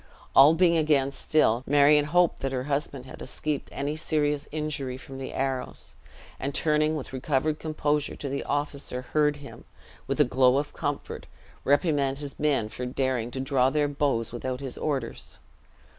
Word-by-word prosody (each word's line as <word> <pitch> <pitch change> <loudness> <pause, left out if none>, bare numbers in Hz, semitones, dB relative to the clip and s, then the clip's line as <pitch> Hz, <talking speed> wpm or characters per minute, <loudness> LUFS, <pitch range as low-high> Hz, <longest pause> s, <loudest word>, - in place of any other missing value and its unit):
All 145 +4 +8
being 170 -1 +4
again 145 -4 +2
still, 130 -5 +2
Marion 145 +1 +5
hoped 175 +2 +2
that 135 - -2
her 130 -1 -2
husband 140 -2 -3
had 130 - -11
escaped 150 +2 -3
any 145 +2 -3
serious 150 -2 0
injury 150 -4 -3
from 135 0 -10
the 135 - -5
arrows; 135 -1 -3 0.5
and 140 +1 -3
turning 155 0 +2
with 140 -3 -6
recovered 145 +3 0
composure 150 -2 -1
to 145 - -6
the 140 +1 -3
officer, 140 -3 -3
heard 150 +3 +1
him, 145 -1 -11 0.4
with 135 +2 -2
a - - +8
glow 130 +1 +4
of 145 +1 -2
comfort, 145 -1 -4 0.4
reprimand 140 -2 +2
his 145 -1 -8
men 145 -7 +1
for 125 +3 -5
daring 125 -2 -1
to 130 - -6
draw 130 -1 +2
their 150 +1 +1
bows 140 -5 0
without 125 +1 -3
his 135 -2 -5
orders. 135 -6 -3
140 Hz, 165 wpm, -27 LUFS, 130-150 Hz, 0.5 s, All